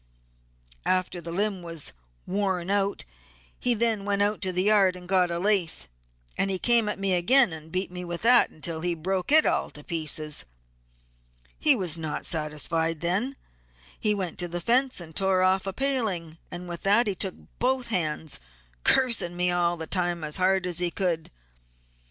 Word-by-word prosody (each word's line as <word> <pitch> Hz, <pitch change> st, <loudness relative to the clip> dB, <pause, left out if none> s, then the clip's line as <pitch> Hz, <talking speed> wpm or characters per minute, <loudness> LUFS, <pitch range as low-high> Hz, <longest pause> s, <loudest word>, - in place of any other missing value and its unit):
After 185 Hz, -1 st, 0 dB
the 170 Hz, 0 st, -6 dB
limb 200 Hz, +1 st, +1 dB
was 165 Hz, -3 st, -5 dB, 0.3 s
worn 190 Hz, -2 st, -1 dB
out 200 Hz, 0 st, 0 dB, 0.5 s
he 245 Hz, -1 st, +2 dB
then 225 Hz, -2 st, 0 dB
went 200 Hz, 0 st, +1 dB
out 205 Hz, +1 st, 0 dB
to 190 Hz, -2 st, -1 dB
the 180 Hz, +1 st, 0 dB
yard 200 Hz, -3 st, +4 dB
and 180 Hz, -1 st, -11 dB
got 180 Hz, -1 st, +2 dB
a 170 Hz, -, -2 dB
lath, 180 Hz, -, 0 dB, 0.5 s
and 195 Hz, -, +1 dB
he 190 Hz, -, +2 dB
come 230 Hz, +1 st, +2 dB
at -, -, -3 dB
me 195 Hz, -1 st, 0 dB
again 210 Hz, +3 st, +4 dB
and 160 Hz, 0 st, -10 dB
beat 185 Hz, +1 st, -2 dB
me 180 Hz, 0 st, -6 dB
with 175 Hz, +1 st, -6 dB
that 245 Hz, +1 st, +5 dB
until 160 Hz, +1 st, -6 dB
he 175 Hz, 0 st, -1 dB
broke 185 Hz, -, -2 dB
it 310 Hz, +1 st, +7 dB
all -, -, 0 dB
to 150 Hz, -, -9 dB
pieces. 155 Hz, -2 st, +2 dB, 1.1 s
He 295 Hz, -3 st, +5 dB
was 175 Hz, -7 st, +1 dB
not 155 Hz, -2 st, -4 dB
satisfied 160 Hz, +1 st, -1 dB
then; 200 Hz, +11 st, 0 dB, 0.6 s
he 210 Hz, -, +1 dB
next -, -, -5 dB
went 185 Hz, -3 st, -4 dB
to 175 Hz, -, -1 dB
the 175 Hz, +1 st, -4 dB
fence 250 Hz, +7 st, +2 dB
and 160 Hz, -2 st, -9 dB
tore 190 Hz, -1 st, +2 dB
off 190 Hz, +1 st, +2 dB
a -, -, -1 dB
paling, 195 Hz, -, 0 dB
and 180 Hz, +1 st, -7 dB
with 170 Hz, -1 st, -6 dB
that 210 Hz, +5 st, +3 dB
he 205 Hz, -, 0 dB
took 190 Hz, 0 st, -2 dB, 0.2 s
both 255 Hz, 0 st, 0 dB
hands, 160 Hz, -6 st, -2 dB, 0.4 s
'cursing' 230 Hz, -9 st, +2 dB
me 180 Hz, 0 st, +1 dB
all 175 Hz, -1 st, +1 dB
the 160 Hz, -, -3 dB
time 175 Hz, -2 st, -1 dB
as 150 Hz, 0 st, -2 dB
hard 190 Hz, 0 st, +2 dB
as 175 Hz, -2 st, -3 dB
he 175 Hz, -1 st, 0 dB
could. 170 Hz, -3 st, -2 dB
185 Hz, 185 wpm, -26 LUFS, 170-205 Hz, 1.1 s, it